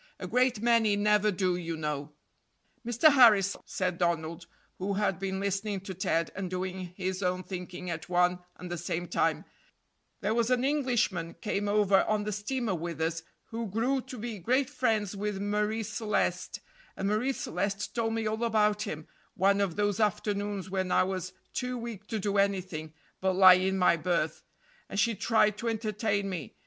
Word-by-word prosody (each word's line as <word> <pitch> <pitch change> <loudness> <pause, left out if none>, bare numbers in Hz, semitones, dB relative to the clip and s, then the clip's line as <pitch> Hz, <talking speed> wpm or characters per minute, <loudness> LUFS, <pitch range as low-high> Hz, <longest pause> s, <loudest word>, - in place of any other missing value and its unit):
A - - -5
great 250 -3 +2
many 230 -3 +4
never 210 +1 +3
do, 185 -2 +1
you 165 -2 -4
know." 150 -1 -3 0.7
"Mr. 240 +6 +5
Harris," 210 -7 +6
said 185 -2 -2
Donald, 170 0 -1 0.3
who 195 +2 -1
had 195 -4 0
been 190 0 -2
listening 200 +1 -1
to 195 0 -6
Ted 165 -3 0
and 190 -2 -4
doing 185 0 -4
his 190 0 -2
own 180 0 0
thinking 180 -1 -7
at 165 +1 -6
one 180 0 +3 0.2
and 180 -1 -9
the 175 - -3
same 175 +1 -3
time, - - 0 0.8
"there 210 +2 0
was 235 0 +1
an 250 0 +2
Englishman 245 - 0
came 205 -2 -2
over 205 -2 +4
on 215 -1 0
the 210 - -3
steamer 215 +2 -2
with 170 -2 -4
us, 165 +1 -1 0.3
who 230 0 -3
grew 245 +7 0
to 255 0 -9
be 225 -2 -5
great 255 +8 +1
friends 220 -7 0
with 205 0 -3
Marie 210 +2 0
Celeste, 205 -4 -1 0.4
and 195 - -1
Marie 215 +6 +1
Celeste 200 -4 -3
told 225 -1 0
me 225 -1 -1
all 220 +2 -1
about 210 -2 +2
him 155 -6 -5 0.3
one 200 +2 +3
of 195 -4 0
those 205 -1 0
afternoons 205 -2 -1
when 190 -1 -2
I - - +4
was 185 -1 -3 0.2
too 250 0 -2
weak 230 -3 -7
to 220 - -2
do 200 0 0
anything 185 -6 -1 0.3
but 190 0 +1
lie 185 0 +9
in 190 +1 +1
my 180 -2 +4
berth, 165 -2 -1 0.5
and 195 - -2
she 230 +2 +3
tried 210 0 +2
to 230 - -1
entertain 215 -2 -1
me. 170 - -5
200 Hz, 180 wpm, -29 LUFS, 180-220 Hz, 0.8 s, lie